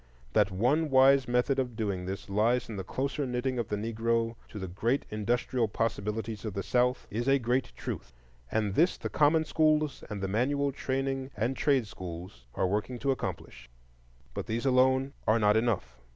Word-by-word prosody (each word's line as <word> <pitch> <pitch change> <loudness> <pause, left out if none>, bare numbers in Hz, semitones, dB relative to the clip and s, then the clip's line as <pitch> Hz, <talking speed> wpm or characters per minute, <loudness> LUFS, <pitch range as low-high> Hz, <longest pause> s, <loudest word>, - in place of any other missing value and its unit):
That - - +4
one 130 +12 +1
wise 135 0 +5
method 125 +3 +2
of 125 -3 -2
doing 100 -5 -2
this 95 +1 -5
lies 115 +5 +1
in 110 - -5
the 95 - -4
closer 135 +7 -2
knitting 125 +1 -1
of 115 - -2
the 105 - -1
Negro 115 +2 -1
to - - -9
the 95 -2 -4
great 115 +9 0
industrial 115 +3 0
possibilities 105 0 -2
of 110 -4 -5
the 100 - -2
South 125 +1 +1
is 120 +5 -2
a 135 0 +5
great 125 +1 0
truth. - - -6 0.4
And 105 -3 0
this 170 - +3
the - - -4
common 155 +2 +3
schools 155 -2 +1
and 105 -2 -4
the 95 - -2
manual 140 +7 +1
training 135 0 -2
and 115 +6 0
trade 135 -5 +2
schools 85 - -9
are - - +1
working 105 +6 -1
to 135 +3 0
accomplish. 65 - -5 0.6
But - - -5
these 115 +4 -2
alone 130 +1 +3
are 110 - +5
not 105 -2 +4
enough. 95 - 0
120 Hz, 180 wpm, -29 LUFS, 105-135 Hz, 0.6 s, wise